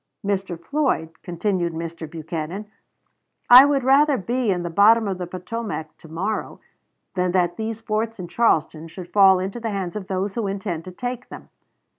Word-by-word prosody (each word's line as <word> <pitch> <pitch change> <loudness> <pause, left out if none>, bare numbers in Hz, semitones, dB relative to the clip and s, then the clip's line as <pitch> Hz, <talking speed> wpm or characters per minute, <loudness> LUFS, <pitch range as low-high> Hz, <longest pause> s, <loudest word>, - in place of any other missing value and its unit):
"Mr. 195 -4 -2
Floyd," 260 - -1
continued 175 -1 -2
Mr. 165 -1 -6
Buchanan, 165 +4 -5 0.9
"I 255 +3 +11
would 285 -2 +1
rather 275 +2 +4
be 240 +3 -1
in 180 -2 0
the 175 - -4
bottom 215 +5 +5
of 190 -2 -3
the 180 - -4
Potomac 185 -3 -5
to - - -14
morrow 190 +7 -3 0.5
than 180 -1 0
that 175 -2 +1
these 220 +1 -4
forts 225 +1 -2
in 180 - -5
Charleston 165 -7 +1
should 175 +1 -10
fall 195 -2 +7
into 195 +5 -4
the 230 -1 -3
hands 195 -3 -4
of 200 -3 -5
those 195 +1 -2
who 230 -4 -2
intend 195 -4 -4
to 185 - -8
take 245 +6 -5
them. - - -11
195 Hz, 175 wpm, -22 LUFS, 175-225 Hz, 0.9 s, I